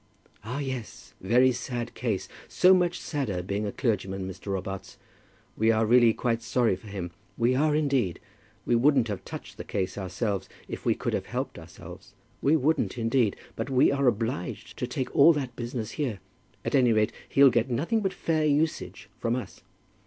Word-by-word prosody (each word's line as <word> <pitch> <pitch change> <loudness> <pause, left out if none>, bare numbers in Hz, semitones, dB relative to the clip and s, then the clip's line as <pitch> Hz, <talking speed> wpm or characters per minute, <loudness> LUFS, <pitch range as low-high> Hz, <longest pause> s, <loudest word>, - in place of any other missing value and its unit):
"Ah, 120 +5 -4
yes; 130 -5 -6
very 125 +7 +4
sad 120 -1 -4
case! 110 -6 -2 0.2
So 185 +1 +5
much 180 -1 +2
sadder 115 - -2
being 100 +3 -2
a - - -2
clergyman, 95 -5 -1
Mr. 95 +2 -9
Robarts. 95 0 -4 0.6
We 110 +1 +2
are 110 0 +2
really 120 0 +6
quite 115 0 -1
sorry 115 -3 +1
for 95 +4 -14
him; 95 -4 -5 0.3
we 120 +1 +3
are 150 +3 +2
indeed. 135 - +1 0.5
We - - +1
wouldn't 125 -1 +4
have 100 -4 -4
touched - - -9
the - - -6
case 95 +1 -3
ourselves 95 +2 -2 0.2
if - - -7
we - - +4
could - - -3
have - - -2
helped - - -4
ourselves. - - -12 0.3
We 145 +3 +4
wouldn't 155 -2 +1
indeed. 115 -2 +2 0.2
But 115 +4 -4
we 130 0 +4
are 140 -1 +1
obliged 115 -5 -2
to - - -1
take 130 - -4
all 155 +4 +8
that 130 -5 -4
business 120 -2 -4
here. 130 -9 -2 0.5
At - - -2
any 125 -4 +5
rate 110 0 +2 0.2
he'll 140 -1 +6
get 120 +2 +1
nothing 160 - 0
but 190 -2 0
fair 160 -4 0
usage 155 +2 0
from 115 +1 0
us." 125 - -6
120 Hz, 180 wpm, -27 LUFS, 105-135 Hz, 0.6 s, all